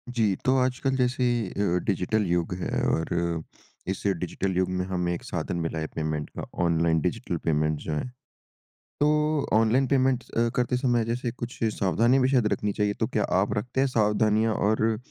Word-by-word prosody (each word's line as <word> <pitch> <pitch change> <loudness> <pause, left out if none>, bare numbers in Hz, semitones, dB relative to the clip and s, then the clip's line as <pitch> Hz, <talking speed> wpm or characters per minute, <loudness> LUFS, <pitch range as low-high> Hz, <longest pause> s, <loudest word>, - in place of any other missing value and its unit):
जी। 105 -4 +2
तो 130 - +4
आजकल 130 +1 0
जैसे 125 0 +1 0.3
अ, 100 -3 0
डिजिटल 100 +2 0
युग 85 0 0
है 90 - -2
और 80 - 0 0.8
इस - - -10 0.2
डिजिटल 95 +2 -2
युग 95 0 +1
में 90 0 -1
हमें 90 -2 -1
एक 85 - -6
साधन 90 +1 -3
मिला 80 0 -2
है 80 - -3
पेमेंट 75 -1 -2
का - - -4 0.2
ऑनलाइन 85 -1 +2
डिजिटल - - -2
पेमेंट्स 75 -1 +1
जो 80 - -2
हैं। 75 - -2 0.9
तो 150 0 +2
ऑनलाइन 115 +5 +3
पेमेंट्स 130 -2 +1
अ, 115 0 +1
करते 125 0 +1
समय 120 -3 +1
जैसे 120 +1 -2
कुछ 120 0 -7 0.2
सावधानी 115 +8 +3
हमें 130 -1 +3
शायद 125 -5 +3
रखनी 105 -1 -2
चाहिए, 105 0 0
तो - - -1
क्या - - 0 0.2
आप - - -1
रखते 125 +5 -2
हैं 135 - +3
सावधानियाँ? 110 -1 +2
और 110 +2 +1
105 Hz, 180 wpm, -26 LUFS, 90-125 Hz, 0.9 s, तो